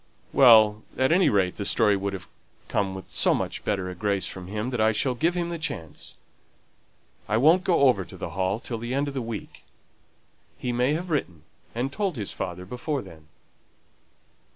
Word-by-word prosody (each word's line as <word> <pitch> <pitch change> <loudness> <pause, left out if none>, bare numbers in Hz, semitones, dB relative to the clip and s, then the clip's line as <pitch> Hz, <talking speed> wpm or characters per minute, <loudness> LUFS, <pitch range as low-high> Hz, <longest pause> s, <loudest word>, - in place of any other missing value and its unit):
"Well, 110 -5 +7 0.2
at 130 +2 +2
any 180 +3 +5
rate, 95 -3 +1
the 100 - -3
story 105 +1 +3
would 100 0 -3 0.5
come 95 -2 -1
with 95 - -10
so - - +3
much - - -3
better 95 -3 -1
a 90 - -5
grace 100 0 -1
from 90 -1 -6
him 105 +5 -3
that 125 -3 -1
I 110 +1 +4
shall 130 +4 0
give 165 +8 0
him 170 -1 -1
the 170 - -4
chance; 110 - -6 1.1
I 110 - +2
won't 160 +9 +5
go 175 -5 +2
over 125 -8 +4
to - - -12
the 85 - -5
Hall 95 +3 -1
till 120 -2 -5
the 120 +3 -3
end 140 +1 0
of - - -7
the 135 - -2
week; 115 -3 -7 0.9
he 125 - -3
may 125 +4 +1
have 175 +3 -3
written 90 - -2 0.3
and 130 +4 -2
told 195 -5 -1
his 105 -5 -3
father 90 0 -5
before 125 +7 -3
then." 80 -5 -14
110 Hz, 190 wpm, -26 LUFS, 95-140 Hz, 1.1 s, Well